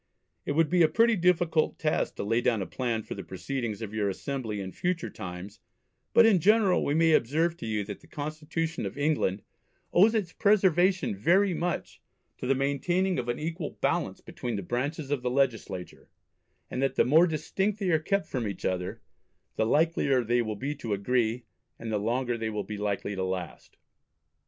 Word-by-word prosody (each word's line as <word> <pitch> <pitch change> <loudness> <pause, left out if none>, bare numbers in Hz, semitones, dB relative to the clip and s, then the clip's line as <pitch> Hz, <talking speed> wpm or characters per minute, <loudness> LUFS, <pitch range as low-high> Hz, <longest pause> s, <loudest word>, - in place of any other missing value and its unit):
It - - 0
would 160 +1 +2
be 180 -1 +4
a 160 - +7
pretty 230 +5 +3
difficult 175 -3 +2
task 155 -1 0
to - - -4
lay 115 +3 +1
down 120 -3 +2
a - - -5
plan 115 -2 -2
for - - -6
the 100 - -7
Proceedings 110 +4 -4
of 110 -1 -6
your 105 -2 0
Assembly 110 0 -4
in 95 -1 -5
future 180 - -2
times, 95 0 -8 0.5
but 235 - +7
in 210 -5 +5
general 205 0 +4
we 145 - 0
may 165 0 +4
observe 160 +7 +2
to 115 - -6
you 105 -1 -1
that 100 0 -7
the - - -19
Constitution 155 +2 -3
of - - -9
England 145 -10 0 0.5
owes 210 +6 +5
its 195 -6 -1
preservation 190 - +3
very 180 - +3
much 175 0 -3 0.4
to - - -4
the 135 - +3
maintaining 175 +7 0
of 120 -1 -4
an 120 - -1
equal 160 0 -4
Balance - - -1
between 120 -2 -5
the 100 - -4
branches 140 - -3
of 145 -3 0
the 125 - -1
legislature, 125 -8 -2 0.6
and 125 - -2
that 135 - 0
the - - +4
more 160 +7 +6
distinct 190 +6 -1
they 195 -4 0
are 160 - +4
kept 200 +5 0
from 120 -5 -3
each 100 - -6
other, 90 0 -2 0.5
the 110 - +1
likelier 145 -3 +2
they 120 +2 +2
will 110 -2 -3
be 135 +8 -3
to 120 -7 -4
agree, 115 +3 0 0.3
and 115 -1 -6
the 105 - 0
longer 120 +2 -1
they 110 0 -2
will 105 -1 -3
be 105 - -6
likely 105 0 -2
to 95 -1 -2
last." 95 -2 -5
135 Hz, 195 wpm, -28 LUFS, 110-170 Hz, 0.6 s, a